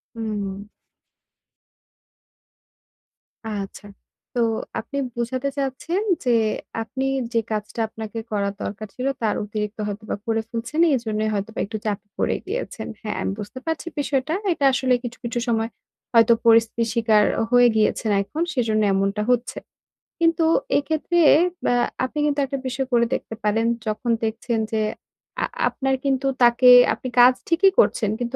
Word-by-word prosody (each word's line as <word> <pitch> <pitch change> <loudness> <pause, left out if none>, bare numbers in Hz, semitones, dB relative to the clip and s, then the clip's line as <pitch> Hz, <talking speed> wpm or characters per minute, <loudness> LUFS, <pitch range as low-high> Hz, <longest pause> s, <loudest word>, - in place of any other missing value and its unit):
হুম। 205 -3 -4 2.9
আচ্ছা। 200 0 -6 0.5
তো - - 0 0.4
আপনি 280 - -6 0.2
বোঝাতে 255 +3 -2
চাচ্ছেন 280 +7 -2 0.2
যে 245 - +3 0.5
আপনি 265 +4 -4 0.3
যে 230 - +3
কাজটা 215 +1 -4
আপনাকে 220 0 -8
করার 200 -1 -1
দরকার 215 +1 -5
ছিল, 255 +1 -2
তার 220 -2 +1
অতিরিক্ত 210 +1 -4
হয়তোবা 210 +1 -4
করে 225 -1 0
ফেলছেন। 230 +7 -4 0.2
এজন্যই 220 -3 -1
হয়তোবা 205 +2 -4
একটু 215 +2 -5
চাপে 205 -1 -3
পড়ে - - +1
গিয়েছেন। 390 - -4
হ্যাঁ, 210 -1 -4
আমি - - -1
বুঝতে 210 +5 -7
পারছি 325 +1 -3
বিষয়টা। 280 +1 0 0.2
এটা 285 - -1
আসলে 255 0 +2
কিছু, 245 0 -6
কিছু 240 +1 -2
সময় 225 -1 0 0.4
হয়তো 230 0 +6
পরিস্থিতির 230 0 +4
শিকার 220 -2 +4 0.3
হয়ে 245 0 +6
গিয়েছেন 215 0 +1
এখন, 305 +10 -5
সেজন্য 225 -5 +1
এমনটা 195 +2 0
হচ্ছে। 245 -1 0 0.6
কিন্তু 330 -1 +3 0.3
এক্ষেত্রে, 315 +4 0 0.5
ব্যা 245 - +3 0.3
আপনি 260 - -7
কিন্তু 290 -1 0
একটা 275 +1 -4
বিষয় 255 +1 -2
করে 235 -1 +4
দেখতে 225 - -4
পারেন, 215 +2 +1 0.2
যখন 230 +3 -1
দেখছেন 225 +1 -1
যে 220 -1 0 0.6
আ - - +3 0.2
আপনার 270 -1 -1
কিন্তু 270 0 +1 0.2
তাকে 240 +1 +6 0.2
আপনি - - -6
কাজ 245 +1 +8
ঠিকই 360 +4 +4
করছেন 220 - +3
কিন্তু 245 +1 -3
230 Hz, 140 wpm, -23 LUFS, 215-265 Hz, 2.9 s, কাজ